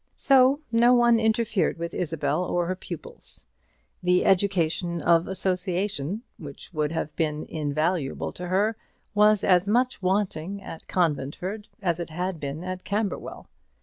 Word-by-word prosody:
So 270 +1 +4
no 240 +2 +5
one 240 -1 +5
interfered 220 -4 +1
with 170 0 -5
Isabel 155 -1 -1
or 175 -1 0
her 185 +2 -2
pupils. 475 - -9 0.6
The 180 0 +3
education 175 -3 +1
of 165 +1 +3
association, 185 - -2 0.2
which 145 +2 -10
would 150 -1 0
have 160 -2 -3
been 155 -1 -1
invaluable 155 0 -1
to 180 - -7
her, 205 +5 +1 0.4
was 210 0 +4
as 180 0 +4
much 245 +2 +1
wanting 190 -1 -1
at 175 -4 -10
Conventford 180 +5 -1 0.2
as 175 -2 0
it 170 - -4
had 180 +1 -3
been 145 +3 -5
at 185 0 -5
Camberwell. 205 0 -3
180 Hz, 140 wpm, -26 LUFS, 165-205 Hz, 0.6 s, no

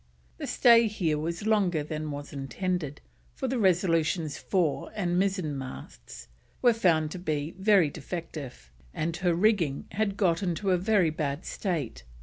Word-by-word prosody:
The - - -4
stay 235 -1 +6
here 170 -8 -1
was 170 +5 -3
longer 195 -8 +2
than 155 0 -4
was 145 +1 -7
intended, 150 +2 -3 0.3
for 265 - -3
the 255 -1 -1
Resolution's 165 -5 +2
fore 175 -7 -1
and 180 -4 0
mizzen 185 -6 0
masts 135 -1 -9 0.3
were 245 -2 +5
found 165 -8 +2
to 180 - -6
be 155 -2 -2
very 190 -6 +4
defective, 150 - -7 0.2
and 165 +1 -1
her 175 -2 +1
rigging 175 -7 +2
had 200 +1 -1
got 180 -3 +2
into 190 +1 -1
a 180 - +4
very 190 -4 +3
bad 150 0 -3
state. 165 - -3
175 Hz, 150 wpm, -28 LUFS, 155-195 Hz, 0.3 s, stay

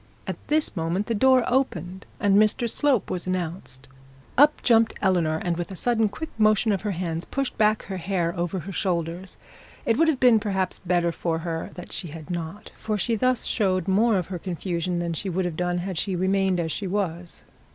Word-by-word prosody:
At - - -4
this 305 -4 +1
moment 170 +4 -1
the 230 - -1
door 260 +3 +4
opened, 190 - -1
and 200 -1 +3
Mr 215 +3 +3
Slope 265 0 +1
was 180 -1 -3
announced. 165 -8 -4 0.5
Up 295 +3 +5
jumped 225 -2 +4
Eleanor, 175 -5 +2
and 170 +1 -2
with 175 - -4
a 190 - -7
sudden 225 +1 +1
quick 310 +10 -7
motion 215 +1 +4
of 195 - 0
her 210 - -2
hands 170 -3 -3
pushed 275 +4 -3
back 215 0 +3
her 190 -1 -5
hair 175 -1 -1
over 175 +1 -2
her 195 - -7
shoulders. 180 -1 -2 0.5
It 225 - +2
would 325 +2 +4
have 305 -5 +2
been 245 -3 +6
perhaps 190 -3 -2
better 175 -2 +1
for 165 0 -2
her 165 -1 -3
that 180 - -9
she 175 - -3
had 155 +1 -9
not, 175 +5 -5
for 215 -1 -2
she 230 +3 0
thus 255 +3 +1
showed 190 -4 0
more 210 +3 +3
of 180 - -1
her 180 -2 -4
confusion 175 0 -3
than 170 -1 -2
she 190 +5 -3
would 185 +1 -1
have 175 -3 -3
done 175 +1 -1
had 180 -1 -3
she 195 -2 -1
remained 190 0 +1
as 165 -1 -1
she 195 - -3
was. 180 -3 -3
190 Hz, 205 wpm, -25 LUFS, 175-215 Hz, 0.5 s, been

